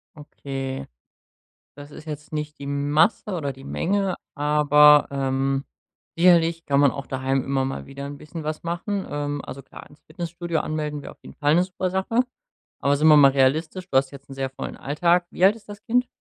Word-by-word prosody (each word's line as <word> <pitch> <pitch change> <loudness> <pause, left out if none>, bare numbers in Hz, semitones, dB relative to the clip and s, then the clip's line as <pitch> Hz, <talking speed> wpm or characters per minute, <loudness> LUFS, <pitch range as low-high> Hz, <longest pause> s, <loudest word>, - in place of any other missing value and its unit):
Okay. 135 -3 -6 0.9
Das 145 0 -11
ist 155 - -11
jetzt 150 0 -8
nicht 150 -1 -4
die 140 - -7
Masse 145 +9 +1
oder 145 -6 -3
die 135 +1 -14
Menge, 195 +5 -1 0.2
aber, 150 0 +5
ähm, 135 0 -1 0.5
sicherlich 170 -1 +4
kann 140 -1 +2
man 140 -2 +5
auch 140 +1 -7
daheim 135 0 -1
immer 135 -1 0
mal 135 - -5
wieder 140 0 -8
'n 140 0 -7
bisschen 155 +2 -8
was 155 0 -4
machen. 180 +4 -3
Ähm, 145 0 -3
also 135 +1 -8
klar, - - -13
ins 145 - -20
Fitnessstudio 170 -2 -4
anmelden 150 -2 -3
wäre - - -9
auf - - -32
jeden - - -12
Fall 145 +1 +2
'ne 175 - +4
super 185 0 -3
Sache. 190 +5 -1 0.6
Aber 140 0 +2
sind 155 +2 +3
wir 155 - +8
mal 140 -2 +7
realistisch, 155 +7 +1
du 135 - +3
hast 135 0 +1
jetzt 140 -1 -13
'n - - -8
sehr 135 0 -2
vollen 130 - -7
Alltag. 170 +5 +1
Wie 185 - +3
alt 200 +3 +5
ist 215 -2 -17
das 205 0 -9
Kind? 245 +2 +1
150 Hz, 200 wpm, -23 LUFS, 140-170 Hz, 0.9 s, wir